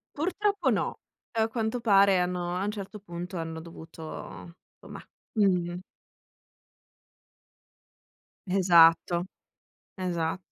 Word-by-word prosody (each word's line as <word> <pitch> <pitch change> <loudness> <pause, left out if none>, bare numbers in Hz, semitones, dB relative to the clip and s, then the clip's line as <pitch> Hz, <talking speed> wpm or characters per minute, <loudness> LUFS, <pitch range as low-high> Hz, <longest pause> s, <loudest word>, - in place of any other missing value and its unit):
Purtroppo 400 +6 0
no, - - -1 0.4
a 220 0 +3
quanto 225 +1 -2
pare 200 -4 +5
hanno 180 0 -1
a 185 - -1
un 210 - -1
certo 210 0 -7
punto 175 -1 -7
hanno 160 -1 -5
dovuto 165 -1 -11 0.8
somma - - -10 0.3
mh, 220 - +1
mh, 175 -2 +1
mh. 175 - -6 2.7
Esatto, 175 -2 +5 0.7
esa 175 -2 -2
180 Hz, 105 wpm, -28 LUFS, 170-210 Hz, 2.7 s, pare